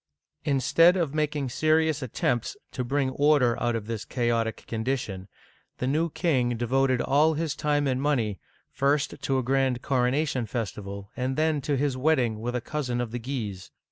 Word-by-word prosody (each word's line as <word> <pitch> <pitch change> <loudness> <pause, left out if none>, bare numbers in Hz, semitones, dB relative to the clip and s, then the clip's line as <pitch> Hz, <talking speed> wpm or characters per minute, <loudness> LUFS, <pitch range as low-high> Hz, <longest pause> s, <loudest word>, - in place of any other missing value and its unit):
Instead 165 +5 +4
of 165 -6 -1
making 150 -2 -1
serious 155 +3 +2
attempts 120 -1 -1
to 125 - -3
bring 135 +1 0
order 140 -4 +3
out 120 -1 +1
of 110 -2 -3
this 115 -1 -4
chaotic 115 -2 -1
condition, 110 -5 -3 0.5
the - - -2
new 155 +6 +1
king 130 -8 0
devoted 130 +2 +1
all 155 +4 +3
his 155 -1 -2
time 150 -1 +1
and 130 -1 0
money, 120 -9 0 0.3
first 140 +2 +1
to 135 - 0
a 130 - 0
grand 130 -1 +1
coronation 130 -1 +1
festival, 100 -3 -5
and 130 +1 -2
then 155 -2 +1
to 140 +1 0
his 140 -1 0
wedding 130 -6 +1
with 120 +2 -3
a 125 - -1
cousin 125 -3 -3
of 120 -2 -2
the 120 - -3
Guises. 110 -7 -5
130 Hz, 170 wpm, -27 LUFS, 120-145 Hz, 0.5 s, Instead